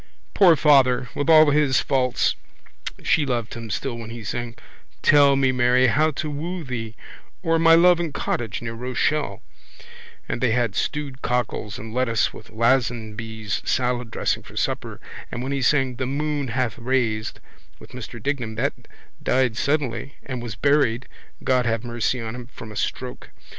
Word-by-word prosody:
Poor 180 -5 +6
father! 135 -4 +4
With 145 +3 -2
all 155 -2 +7
his 145 -3 +3
faults 125 -2 +1 0.7
she 160 - +3
loved 120 -5 -2
him 115 -1 -7
still 120 +4 -3
when 115 -1 -8
he 115 0 -8
sang 115 +4 -4 0.5
Tell 140 -1 +6
me, 135 -1 +3
Mary, 125 0 +3
how 150 +6 +3
to 155 0 -4
woo 165 +4 -4
thee 115 -5 -5 0.5
or 165 0 +2
My 165 0 +7
love 175 +1 +6
and 170 -3 -2
cottage 120 -4 -3
near 115 -1 -4
Rochelle 125 -1 -1 0.8
and - - -3
they 125 -3 +2
had 120 -4 +1
stewed 145 -1 -3
cockles 120 -4 -2
and 110 0 -8
lettuce 115 -3 +1
with 110 - -12
Lazenby's 110 -3 -1
salad 125 -2 0
dressing - - -1
for - - -14
supper - - -2 0.3
and 120 - -4
when 135 - -3
he 140 -1 -1
sang 130 -2 +2
The 130 -1 -2
moon 145 0 -1
hath 120 -1 -2
raised 115 -3 -1 0.4
with - - -15
Mr 120 -1 -8
Dignam 120 -2 -3
that 135 +6 0 0.5
died 130 -3 +1
suddenly 140 -2 -1
and 130 -3 -5
was 115 -4 -6
buried, 130 -1 +2 0.4
God 125 -2 +2
have 115 -1 0
mercy 120 +1 -1
on 110 -1 -5
him, 125 -1 -8
from 115 -3 -10
a - - -10
stroke. 125 +4 -4
125 Hz, 165 wpm, -23 LUFS, 115-140 Hz, 0.8 s, all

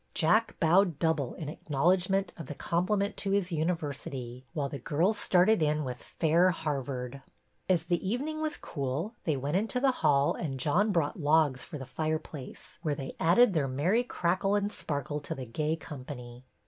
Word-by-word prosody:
Jack 220 +8 +2
bowed 175 -1 +4
double 160 -5 0
in 155 - -6
acknowledgment 180 +6 +1
of 165 -5 -8
the 150 - -6
compliment 200 +6 0
to 200 - -2
his 195 -2 +1
university, 140 -6 -3
while 140 +1 -1
the 140 0 -6
girls 170 - +1
started 185 +2 +4
in 150 0 +2
with 125 -2 -5
Fair 170 +3 +3
Harvard." 140 -5 -3 0.5
As 175 -3 +3
the 175 0 -1
evening 280 +10 -2
was 310 -1 -1
cool 145 - -3
they 155 -4 +1
went 145 +6 0
into 225 +5 0
the 270 +1 +4
hall 145 -2 +4
and 135 -6 -4
John 180 - +2
brought 165 -3 0
logs 150 -3 +3
for - - -7
the 135 - -7
fireplace, 155 0 -5
where 155 -4 0
they 135 -1 -6
added 190 +7 +5
their 150 -5 +1
merry 170 - +1
crackle 190 -2 0
and 205 0 0
sparkle 145 -3 -3
to 145 - -5
the 130 - -6
gay 150 +7 -1
company. 130 -5 -9
160 Hz, 175 wpm, -30 LUFS, 140-185 Hz, 0.5 s, added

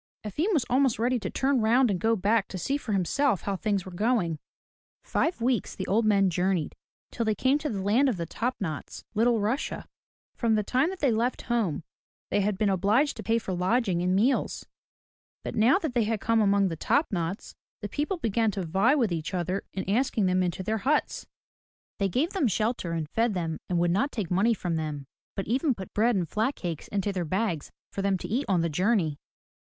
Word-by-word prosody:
Efim 305 - -1
was 295 - +2
almost 260 -1 +2
ready 245 +2 +1
to - - -4
turn 270 -2 +1
round 235 +2 +4
and 185 - -1
go 225 +5 +2
back 205 +1 +1
to 190 - -6
see 270 +10 -1
for 285 -6 -4
himself 200 +4 +1
how 200 - -1
things 200 -1 -1
were 185 - -8
going. 180 -5 0 0.6
Five 330 -6 -1
weeks 245 -1 0
the 190 - -4
old 220 +3 +2
men 200 -3 +3
journeyed, 180 -2 0 0.4
till 235 - -2
they 215 -1 +1
came 265 +7 +2
to 300 - -3
the 195 -4 -3
land 240 +8 +3
of 225 - -1
the 170 - -3
Top 240 +9 -2
Knots 160 -7 -5
(Little 230 +1 +3
Russia). 225 +8 -2 0.5
From 230 -2 +1
the 210 - +1
time 260 - +1
that 380 -1 -7
they 275 -4 +3
left 235 +3 0
home 220 -10 -1 0.5
they 205 - +2
had 200 0 0
been 210 - +1
obliged 205 - +2
to - - -5
pay 230 0 +1
for 200 -4 -3
lodging 185 0 +1
and 180 +1 +1
meals, 240 +8 +1 0.8
but - - -4
now 235 +8 +4
that 315 -9 -3
they 235 -3 +2
had 220 0 -1
come 230 +2 +2
among 200 -1 +3
the 165 - -3
Top 285 - +1
Knots 175 +1 -3 0.3
the 205 - -3
people 295 - -2
began 225 - +1
to 195 -2 -3
vie 195 - +3
with 235 -9 +1
each 165 +2 -3
other 180 +2 -2
in 190 - -5
asking 220 0 +1
them 185 0 +2
into 180 +1 -2
their 220 +3 -1
huts. 290 +8 0 0.7
They 195 -1 +1
gave 290 - 0
them 370 -10 +2
shelter 215 -4 -1
and 160 -2 -2
fed 225 +5 0
them 165 -3 -2
and 180 - +1
would 170 0 +2
not 210 +11 +1
take 200 -7 -4
money 210 +6 +3
from 175 -4 -2
them, 150 -3 -4 0.3
but 195 - -3
even 260 - +1
put 190 -2 -9
bread 230 +2 +3
and 180 -3 0
flat 220 - 0
cakes 170 -4 -5
into 200 0 -1
their 180 -2 -1
bags 180 -2 -2 0.2
for 195 - -3
them 195 -1 +1
to - - -6
eat 260 +6 -1
on 180 -3 +3
the 170 - +1
journey. 170 -2 +1
210 Hz, 220 wpm, -27 LUFS, 185-240 Hz, 0.8 s, round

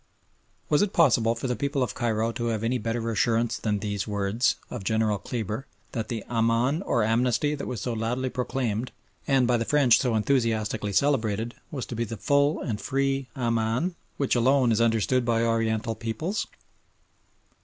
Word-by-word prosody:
Was 150 - +3
it 205 -1 0
possible 120 -8 +4
for 115 - -6
the 125 -1 0
people 140 +2 -1
of 120 - -3
Cairo 115 -1 0
to 120 0 -4
have 110 -2 -1
any 125 +2 0
better 115 +1 -2
assurance 115 +1 +1
than 105 -2 0
these 100 0 -3
words 105 +3 +1 0.2
of 120 -5 -5
General 110 -1 +1
Kleber, 110 +5 -4 0.2
that 115 -3 -3
the 115 -3 -4
"Aman," 115 +6 +1
or 120 - +1
amnesty, 125 +6 +1
that 145 - -5
was 120 -6 -4
so 120 - -2
loudly 120 +4 -1
proclaimed 125 -2 -2 0.4
and, 135 -2 +4
by 120 0 +3
the 115 - 0
French, 130 -4 +4
so 125 -3 +1
enthusiastically 110 -3 0
celebrated, 115 -2 +1 0.2
was 140 -6 -4
to 120 - -6
be 115 - -1
the 115 0 -6
full 140 - +2
and 105 -4 -3
free 135 -1 0
"Aman" 115 +6 0 0.2
which 140 - +1
alone 125 +1 +3
is 110 +1 +2
understood 115 +2 +2
by 115 -1 +1
Oriental 115 -1 0
peoples? 115 - -3
115 Hz, 175 wpm, -26 LUFS, 110-130 Hz, 0.4 s, possible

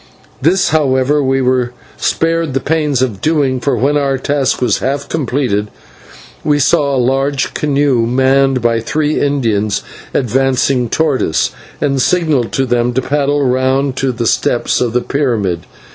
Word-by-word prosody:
This, 175 +7 +2
however, 145 -1 +2
we 135 -1 +1
were 125 -1 0 0.2
spared 165 -3 -1
the - - +2
pains 150 -3 0
of 110 -7 -3
doing, 145 -5 +1
for 140 - 0
when 140 +5 +1
our 140 -2 0
task 140 0 0
was 125 - +1
half 140 +2 -2
completed 125 -8 -1 0.8
we 150 -1 +2
saw 140 0 +2
a - - 0
large 135 +2 0
canoe, 140 -5 +1
manned 130 +1 +2
by 115 -1 +2
three 150 +6 -1
Indians, 115 -8 0 0.3
advancing 130 0 +1
towards 155 -2 +1
us, 80 - 0 0.3
and 140 -2 0
signalled 155 -8 +1
to 135 - +1
them 120 0 0
to 130 - 0
paddle 145 0 0
round 130 +1 +1
to 135 0 0
the 120 -1 -3
steps 120 +1 +1
of 120 -2 0
the 125 - +1
pyramid. 110 - -1
135 Hz, 155 wpm, -14 LUFS, 125-145 Hz, 0.8 s, This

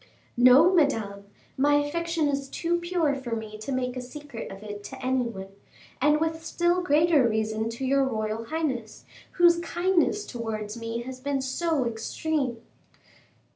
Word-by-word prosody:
"No, 255 +9 +7
Madame, 220 - +1 0.3
my 290 +2 +4
affection 325 +2 0
is 275 -1 -2
too 345 +3 -1
pure 345 -4 0
for 260 -4 -4
me 215 -1 -7
to 215 +6 -5
make 255 -1 -1
a 255 - -4
secret 265 -1 -8
of 195 +2 -10
it 205 -1 -7
to - - -7
any 255 -1 0
one, 195 -5 -6 0.5
and 300 0 +4
with 325 0 -2
still 345 +2 +1
greater 305 -5 +4
reason 220 0 -1
to 235 +3 -4
your 275 +1 +3
royal 220 -3 -2
highness, 265 -7 -3 0.3
whose 345 -1 +5
kindness 355 +4 +1
towards 220 -3 -5
me 230 0 -4
has 260 +1 -8
been 280 +1 -1
so 270 +2 0
extreme. 240 +2 -2
265 Hz, 155 wpm, -26 LUFS, 230-320 Hz, 0.5 s, No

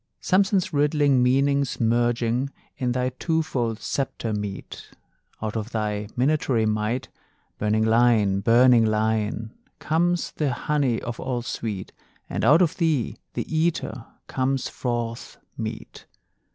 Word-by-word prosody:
Samson's 190 -1 +2
riddling 145 -2 +3
meanings 140 +2 +2
merging 120 +2 +1 0.3
In 125 -1 -1
thy 125 0 0
twofold 155 -9 -1
sceptre 115 -2 -3
meet: 105 -2 -6 0.5
Out 110 0 -3
of 110 0 -3
thy 105 -3 -2
minatory 130 -4 +2
might, 110 +3 -1 0.5
Burning 110 +1 +1
Lion, 110 -4 +3
burning 120 +3 +5
Lion, 110 0 0 0.2
Comes 175 +2 0
the 145 -5 -1
honey 135 -3 0
of 120 -1 -5
all 125 -2 -2
sweet, 105 -5 -4 0.4
And - - -3
out 155 +6 +6
of 165 - -1
thee, 155 -9 0 0.2
the - - -2
eater, 155 -7 -1 0.2
comes 130 0 -1
forth 120 -2 -4 0.2
meat. - - -7
120 Hz, 120 wpm, -24 LUFS, 110-140 Hz, 0.5 s, out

